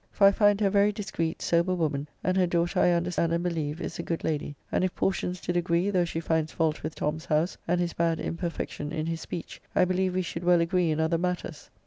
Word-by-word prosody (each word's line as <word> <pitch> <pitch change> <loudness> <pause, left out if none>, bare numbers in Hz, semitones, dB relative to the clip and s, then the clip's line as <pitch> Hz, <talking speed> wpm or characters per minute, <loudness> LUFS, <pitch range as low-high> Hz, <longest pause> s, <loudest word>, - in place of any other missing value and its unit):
For 200 - +3
I 195 - +8
find 205 0 +3
her - - +3
a 195 - +3
very 200 +1 +4
discreet, 195 -6 -3
sober 170 +2 +2
woman, 150 -4 -1 0.2
and 185 - +1
her 185 -1 +3
daughter, 175 +2 +1
I - - +5
understand 170 -1 +1
and 170 +1 0
believe, 160 -3 -2
is - - -5
a - - +1
good 165 -1 -3
lady; 150 -2 -2 0.2
and - - +1
if 185 0 -1
portions 185 -1 -1
did 175 - -3
agree, 175 +2 +1
though 180 -3 +2
she 165 -1 -3
finds 160 -1 0
fault 160 -2 0
with 155 +1 -5
Tom's 155 +2 -2
house, 155 +4 +1
and 175 +1 +2
his 175 -1 -1
bad 165 -1 +1
imperfection 165 -3 -4
in 155 -1 -2
his 165 0 -3
speech, 170 - -7
I 180 - +5
believe 185 0 0
we 185 - +1
should 165 0 -5
well 175 0 +5
agree 170 0 +2
in 155 0 0
other 160 +1 +1
matters. 180 -3 -3
170 Hz, 245 wpm, -27 LUFS, 160-180 Hz, 0.2 s, I